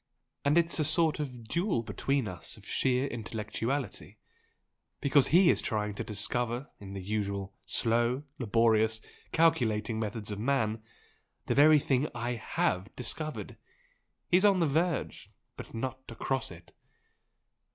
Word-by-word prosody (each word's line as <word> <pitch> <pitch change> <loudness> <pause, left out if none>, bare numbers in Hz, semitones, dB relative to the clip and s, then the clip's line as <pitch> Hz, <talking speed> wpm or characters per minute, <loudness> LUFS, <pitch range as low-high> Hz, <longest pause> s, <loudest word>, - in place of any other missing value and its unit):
And 145 +3 +3
it's 170 0 +3
a - - +3
sort 155 +1 +3
of 125 -6 -6
duel 170 - 0
between 135 +1 -1
us 90 -4 -5
of - - -16
sheer 130 0 +1
intellectuality, 115 +1 -4 0.8
because 140 -1 +4
he 175 +2 +6
is - - 0
trying 105 -3 -1
to - - -4
discover 120 +5 -1
in 100 -1 -9
the 95 -1 -6
usual 100 -1 -3
slow, 120 +3 +1 0.2
laborious, 110 -1 +2 0.3
calculating 115 -9 +2
methods 110 0 -4
of 105 - -4
man 110 -3 0 0.6
the - - 0
very 150 +2 +7
thing 140 0 +1
I 120 +2 -2
HAVE 100 -5 -1
discovered! 155 +5 -4 0.7
He's 180 +2 +4
on 200 -2 +5
the 170 - +3
verge 160 +1 -1 0.3
But - - -9
not 130 +3 -3
across 130 +3 -2
it!" 85 -2 -14
120 Hz, 135 wpm, -30 LUFS, 110-145 Hz, 0.8 s, very